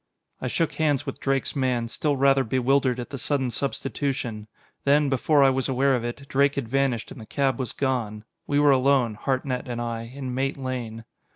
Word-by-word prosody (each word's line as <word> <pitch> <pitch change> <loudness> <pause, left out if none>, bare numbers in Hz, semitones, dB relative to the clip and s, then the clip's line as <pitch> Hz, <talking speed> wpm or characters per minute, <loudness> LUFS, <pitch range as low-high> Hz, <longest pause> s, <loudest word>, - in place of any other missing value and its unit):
I 130 - -2
shook 165 +6 0
hands 150 -4 +1
with - - -5
Drake's 135 +1 -1
man, 125 -4 0
still 145 +4 -1
rather 135 0 +4
bewildered 130 +1 +1
at 120 - -6
the 135 - -5
sudden 135 -2 0
substitution. 130 -4 -3 0.4
Then, 145 +1 +3
before 140 +2 +3
I 135 - +6
was 130 +1 -1
aware 135 +1 +3
of 120 - -2
it, 120 +4 -5
Drake 140 +1 +2
had 140 -5 -2
vanished 130 -2 0
and 125 - -9
the - - -9
cab 135 -3 0
was 125 -4 -3
gone. 120 -6 -2 0.2
We 145 0 +2
were 145 -1 +6
alone, 130 -3 +3
Hartnett 130 +2 -2
and 120 -1 -4
I, 115 -1 -4
in 130 -1 -5
Mate 135 +2 -1
Lane. 120 -4 -5
130 Hz, 195 wpm, -25 LUFS, 120-140 Hz, 0.4 s, I